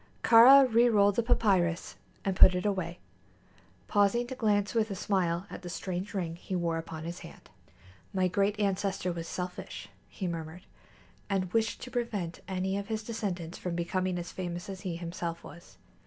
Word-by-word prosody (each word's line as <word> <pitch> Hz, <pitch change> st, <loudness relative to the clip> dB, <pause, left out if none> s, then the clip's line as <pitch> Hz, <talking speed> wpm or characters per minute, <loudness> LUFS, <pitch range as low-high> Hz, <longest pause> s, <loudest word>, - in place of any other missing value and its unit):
Kāra 260 Hz, +4 st, +9 dB
rerolled 225 Hz, -4 st, +4 dB
the 235 Hz, -, +1 dB
papyrus 185 Hz, -7 st, +1 dB, 0.3 s
and 195 Hz, -1 st, 0 dB
put 185 Hz, -, +8 dB
it 180 Hz, -, -2 dB
away, 185 Hz, -4 st, -1 dB, 0.9 s
pausing 205 Hz, +3 st, +2 dB
to 250 Hz, -, -6 dB
glance 205 Hz, -5 st, +1 dB
with 225 Hz, -1 st, +1 dB
a 195 Hz, -, -3 dB
smile 180 Hz, -2 st, 0 dB
at -, -, -7 dB
the 180 Hz, -, -7 dB
strange 185 Hz, +2 st, -4 dB
ring 170 Hz, -3 st, -3 dB
he 185 Hz, -, -5 dB
wore 170 Hz, -2 st, 0 dB
upon 160 Hz, -1 st, -7 dB
his 170 Hz, +2 st, -6 dB
hand. -, -, -13 dB, 0.6 s
"My 185 Hz, -1 st, +1 dB
great 200 Hz, +3 st, 0 dB
ancestor 195 Hz, -2 st, 0 dB
was 165 Hz, -1 st, -6 dB
selfish," 180 Hz, 0 st, -6 dB, 0.2 s
he 190 Hz, -, -6 dB
murmured, 165 Hz, 0 st, -5 dB, 0.6 s
"and 185 Hz, -2 st, -1 dB
wished 225 Hz, 0 st, 0 dB
to 250 Hz, -, -8 dB
prevent 210 Hz, -9 st, -3 dB
any 190 Hz, 0 st, -1 dB
of 200 Hz, -, -6 dB
his 220 Hz, 0 st, -3 dB
descendants 190 Hz, -7 st, -4 dB
from 180 Hz, -2 st, -3 dB
becoming 180 Hz, +1 st, -1 dB
as 175 Hz, 0 st, -5 dB
famous 175 Hz, 0 st, -5 dB
as 190 Hz, -1 st, -7 dB
he 180 Hz, -3 st, -4 dB
himself 170 Hz, 0 st, -5 dB
was. 170 Hz, -, -13 dB
185 Hz, 170 wpm, -30 LUFS, 175-205 Hz, 0.9 s, Kāra